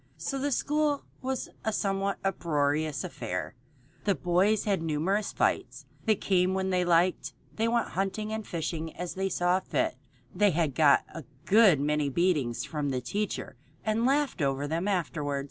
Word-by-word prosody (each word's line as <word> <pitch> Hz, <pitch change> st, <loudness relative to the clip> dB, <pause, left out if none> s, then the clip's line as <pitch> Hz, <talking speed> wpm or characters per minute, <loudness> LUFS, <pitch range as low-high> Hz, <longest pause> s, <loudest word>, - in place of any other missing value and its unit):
So 275 Hz, -, -3 dB
the 285 Hz, +2 st, -1 dB
school 295 Hz, +2 st, +1 dB, 0.2 s
was 265 Hz, -1 st, -2 dB, 0.2 s
a 220 Hz, -, 0 dB
somewhat 195 Hz, -1 st, -1 dB
uproarious 150 Hz, -6 st, 0 dB
affair. 75 Hz, -, -4 dB, 0.5 s
The 200 Hz, -2 st, +3 dB
boys 185 Hz, +6 st, +2 dB
had 200 Hz, -5 st, 0 dB
numerous 165 Hz, +7 st, 0 dB
fights. -, -, -1 dB, 0.2 s
They 220 Hz, -2 st, +4 dB
came 185 Hz, -1 st, +1 dB
when 190 Hz, 0 st, -1 dB
they 180 Hz, -1 st, +2 dB
liked. 175 Hz, +1 st, +2 dB, 0.2 s
They 225 Hz, +1 st, +1 dB
went 235 Hz, 0 st, +1 dB
hunting 205 Hz, +3 st, -2 dB
or 220 Hz, -, -2 dB
fishing 165 Hz, -4 st, -4 dB
as 180 Hz, -1 st, -4 dB
they 190 Hz, 0 st, -1 dB
saw 180 Hz, 0 st, +2 dB
fit. -, -, -1 dB, 0.4 s
They 205 Hz, +3 st, +4 dB, 0.2 s
got 140 Hz, +1 st, +4 dB
a 165 Hz, -, -7 dB, 0.2 s
good 200 Hz, -7 st, +6 dB
many 150 Hz, 0 st, +1 dB
beatings 145 Hz, -6 st, +1 dB
from 150 Hz, -3 st, -2 dB
the 130 Hz, -2 st, -1 dB
teacher 190 Hz, +3 st, -3 dB, 0.3 s
and 220 Hz, +1 st, +1 dB
laughed 275 Hz, -, +1 dB
over 140 Hz, 0 st, 0 dB
them 165 Hz, +5 st, -1 dB
afterward. 150 Hz, -7 st, -1 dB
185 Hz, 160 wpm, -29 LUFS, 155-210 Hz, 0.5 s, good